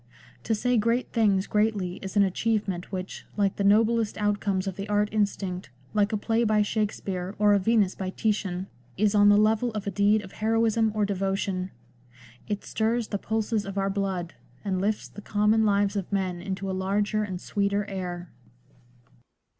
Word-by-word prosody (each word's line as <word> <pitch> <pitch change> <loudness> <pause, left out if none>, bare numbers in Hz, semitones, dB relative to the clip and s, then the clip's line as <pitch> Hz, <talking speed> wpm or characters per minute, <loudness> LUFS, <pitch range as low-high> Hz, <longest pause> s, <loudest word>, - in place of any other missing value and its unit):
To 225 - +1
say 245 +3 +1
great 230 +3 +1
things 200 -4 +3
greatly 210 -4 0
is 195 +1 -5
an 200 - +6
achievement 195 -2 -1
which, 185 -1 -6
like 200 -2 +1
the 200 - 0
noblest 220 +2 +3
outcomes 205 -2 0
of 195 -2 -3
the 200 +1 -6
art 210 0 +2
instinct, 195 -5 -1 0.2
like 210 0 +2
a 215 - +1
play 225 +3 +1
by 215 -2 +3
Shakspere, 200 -3 -2
or 210 0 +4
a 200 - +4
Venus 210 -2 +2
by 190 -1 -4
Titian, 195 -3 -1 0.3
is 210 0 +2
on 205 -1 +6
the 205 - +6
level 220 +3 +3
of 210 -2 -4
a 200 - -2
deed 205 +1 +3
of 190 - -11
heroism 225 0 +1
or 210 -1 +2
devotion. 195 -1 -1 0.8
It 205 -1 -3
stirs 225 +1 -1
the 200 - -2
pulses 220 0 -1
of 195 0 -6
our 195 0 +1
blood, 190 -3 -2 0.3
and 190 -2 0
lifts 210 +2 -1
the 205 - -11
common 215 +1 +2
lives 200 0 +2
of 195 -1 -3
men 185 -3 -1
into 190 +1 -4
a - - -1
larger 200 +3 0
and 190 -4 -3
sweeter 200 +1 -1
air. 180 -3 -5
205 Hz, 180 wpm, -26 LUFS, 195-215 Hz, 0.8 s, an